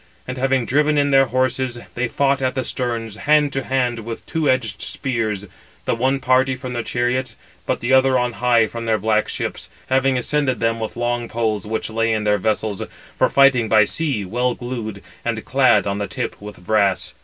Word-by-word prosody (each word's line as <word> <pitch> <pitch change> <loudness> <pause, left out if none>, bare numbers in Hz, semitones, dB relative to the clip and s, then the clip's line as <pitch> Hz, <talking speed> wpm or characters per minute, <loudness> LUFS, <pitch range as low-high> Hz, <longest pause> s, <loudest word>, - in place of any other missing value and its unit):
And 125 0 -5
having 135 -1 +1
driven 150 +4 +2
in 145 0 +2
their 135 -1 +5
horses, 130 0 0 0.2
they 120 0 -1
fought 140 +2 +1
at 130 0 0
the 130 - -1
sterns, 115 -4 -3
hand 150 +2 +3
to 135 - -1
hand 125 -3 0
with 115 +1 -7
two 160 -3 0
edged 115 -6 0
spears, 110 -6 -2 0.4
the - - +1
one 130 +4 +1
party 130 0 +2
from 125 0 -6
their 120 - -1
chariots, 125 +3 -1 0.3
but - - -1
the 120 +2 +1
other 130 0 +5
on 125 -1 0
high 120 +1 +3
from 115 +1 -6
their 110 -1 +3
black 110 +1 +1
ships, - - -4 0.2
having 130 0 +2
ascended 130 0 0
them 115 0 0
with 110 +1 -5
long 120 0 -1
poles 110 -3 -1
which 110 +1 -3
lay 115 0 +1
in 110 -1 -1
their 105 -1 +2
vessels, 110 0 -1 0.3
for - - +2
fighting 130 -5 +4
by 110 -1 +6
sea, 130 -3 -1
well 125 +5 0
glued, 115 -5 -6 0.2
and - - -3
clad - - +3
on 100 0 -2
the 100 - -2
tip - - -5
with 105 -3 -10
brass. 100 -2 +1
120 Hz, 200 wpm, -20 LUFS, 110-130 Hz, 0.4 s, by